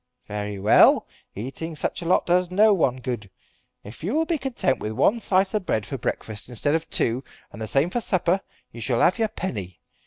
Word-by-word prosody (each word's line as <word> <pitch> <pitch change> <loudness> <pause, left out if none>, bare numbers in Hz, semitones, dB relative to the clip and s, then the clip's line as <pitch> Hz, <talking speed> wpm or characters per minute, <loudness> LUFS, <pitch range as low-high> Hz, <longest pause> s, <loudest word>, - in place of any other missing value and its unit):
"Very 105 -1 -4
well. 100 +2 +5 0.3
Eating 135 +9 -5
such 150 - -2
a - - -6
lot 175 - +3
does 180 0 +2
no 210 +3 +5
one 135 -9 +1
good. 120 -6 -5 0.5
If 110 +8 -11
you 205 - -1
will 320 +1 +2
be 325 -2 -1
content 250 - 0
with 110 - -4
one 200 - +2
slice 190 -2 +2
of 210 -4 -2
bread 110 -1 0
for 135 - -5
breakfast 110 0 -4
instead 135 +4 -1
of 165 0 -1
two, 120 +3 0 0.3
and 105 - -10
the 110 - -3
same 140 +9 +2
for 240 - -1
supper, 185 -2 +1 0.3
you 115 - -9
shall 120 0 +1
have 185 - +3
your 225 - +2
penny. 100 - -5
150 Hz, 210 wpm, -24 LUFS, -, 0.5 s, well